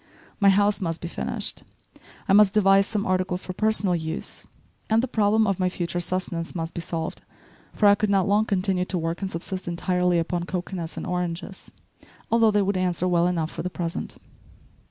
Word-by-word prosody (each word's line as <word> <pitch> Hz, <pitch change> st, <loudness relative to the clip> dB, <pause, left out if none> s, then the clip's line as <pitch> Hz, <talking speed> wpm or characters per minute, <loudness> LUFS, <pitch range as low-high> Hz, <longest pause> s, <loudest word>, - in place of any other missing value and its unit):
My 200 Hz, -2 st, +6 dB
house 205 Hz, +1 st, +3 dB
must 165 Hz, -2 st, -2 dB
be 170 Hz, -, -5 dB
finished, -, -, -4 dB, 0.7 s
I -, -, +3 dB
must 205 Hz, 0 st, +6 dB
devise 195 Hz, -1 st, +5 dB
some 210 Hz, -2 st, -1 dB
articles 185 Hz, -1 st, 0 dB
for 185 Hz, -, -5 dB
personal 210 Hz, -2 st, +1 dB
use, 160 Hz, 0 st, -4 dB, 0.4 s
and 225 Hz, +2 st, +3 dB
the -, -, 0 dB
problem 220 Hz, -1 st, +2 dB
of 195 Hz, -3 st, 0 dB
my 185 Hz, -1 st, +2 dB
future 175 Hz, -1 st, -3 dB
sustenance 175 Hz, -1 st, -3 dB
must 165 Hz, -1 st, -4 dB
be 170 Hz, -, -4 dB
solved, 165 Hz, -1 st, -4 dB, 0.5 s
for 210 Hz, -, +2 dB
I 200 Hz, -, +8 dB
could 210 Hz, +1 st, 0 dB
not 195 Hz, -1 st, +2 dB
long 205 Hz, +2 st, +3 dB
continue 190 Hz, -2 st, 0 dB
to 185 Hz, -, -3 dB
work 165 Hz, +2 st, -3 dB
and 195 Hz, -, -2 dB
subsist 185 Hz, +2 st, -5 dB
entirely 180 Hz, 0 st, +1 dB
upon 170 Hz, +1 st, -1 dB
cocoanuts 175 Hz, -2 st, -5 dB
and -, -, -4 dB
oranges, 180 Hz, +2 st, -4 dB, 0.6 s
although 230 Hz, -1 st, +5 dB
they 205 Hz, -1 st, +2 dB
would 195 Hz, 0 st, 0 dB
answer 180 Hz, -1 st, 0 dB
well 175 Hz, -1 st, +3 dB
enough 165 Hz, -3 st, -1 dB
for -, -, -5 dB
the 180 Hz, -, -3 dB
present. 170 Hz, -2 st, -5 dB
185 Hz, 190 wpm, -25 LUFS, 175-200 Hz, 0.7 s, I